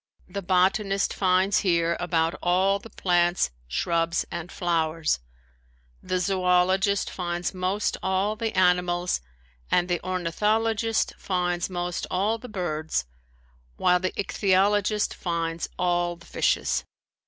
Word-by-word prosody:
The 200 - -5
botanist 195 +2 +2
finds 190 +1 +2
here 170 -3 +2
about 165 -2 +1
all 190 +3 +2
the 225 - -12
plants, 175 - +1 0.2
shrubs 170 - 0
and 170 0 -5
flowers; 165 - 0 0.8
the 185 - -1
zoologist 185 +2 +2
finds 175 0 -3
most 185 +3 -1
all 190 +3 0
the 225 0 -2
animals 180 - +2 0.5
and 175 0 +2
the 175 -2 -1
ornithologist 215 +5 0
finds 180 -1 -1
most 175 -1 -3
all 210 +5 0
the 250 - -10
birds, 160 - -2 0.7
while 180 0 +3
the 185 0 -1
ichthyologist 200 +1 +1
finds 165 -1 -3
all 175 -1 +1
the 170 - -18
fishes. - - 0
180 Hz, 115 wpm, -26 LUFS, 175-195 Hz, 0.8 s, while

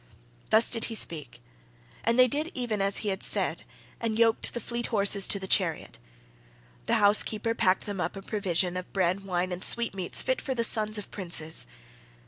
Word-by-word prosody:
Thus 220 +2 +5
did 230 -2 +1
he 225 - -4
speak, 160 - -3 0.6
and 230 +2 +1
they 255 0 +7
did 300 +6 -2
even 235 -5 -2
as 195 0 +3
he - - 0
had 190 0 -3
said, - - 0 0.4
and 225 -2 -2
yoked 225 -1 +3
the - - -2
fleet 235 0 -4
horses 200 -2 +2
to - - +3
the 190 - -5
chariot. 185 -4 -1 0.9
The - - +2
housekeeper 215 +2 +2
packed 190 -4 +1
them 200 -3 -4
up - - -3
a 195 - -8
provision 185 -4 -1
of 185 - -7
bread, 190 +1 0
wine, 180 -1 -2
and 180 +1 -5
sweet 235 -3 +1
meats 185 -2 -2
fit 260 - -1
for 265 - -3
the 235 - 0
sons 215 -1 +4
of 205 - -8
princes. 165 - -1
205 Hz, 190 wpm, -27 LUFS, 185-230 Hz, 0.9 s, they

